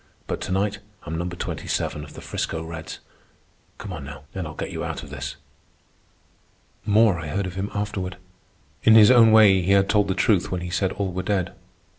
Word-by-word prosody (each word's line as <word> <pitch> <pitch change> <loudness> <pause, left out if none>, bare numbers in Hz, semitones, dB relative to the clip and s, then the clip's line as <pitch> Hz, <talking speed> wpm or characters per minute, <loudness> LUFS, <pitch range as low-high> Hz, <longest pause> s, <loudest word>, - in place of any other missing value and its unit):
But - - -4
to - - -4
night 100 +2 0 0.2
I'm 80 - -5
Number 85 +1 -3
27 - - -3
of - - -12
the - - -9
'Frisco 80 - -3
Reds. 80 0 -7 0.8
Come 100 -3 -7
on 80 -4 -7
now, 70 0 -9
and 95 -4 -4
I'll 80 - -9
get - - -5
you - - -4
out - - -4
of - - -11
this." - - -5 1.5
More 105 -3 +4
I 80 - -6
heard 100 +5 -2
of 90 - -5
him 95 +2 -3
afterward. 95 -3 -3 0.6
In 110 - +6
his 110 +2 +8
own 115 -3 +7
way 105 -4 +7
he 95 +3 +2
had 100 0 +4
told 105 -1 +3
the 95 - -1
truth 95 -2 +2
when 90 -1 -2
he 90 0 -5
said 95 0 0
all 100 -2 -2
were 90 +1 -3
dead. 95 -2 -1
95 Hz, 205 wpm, -24 LUFS, 85-105 Hz, 1.5 s, his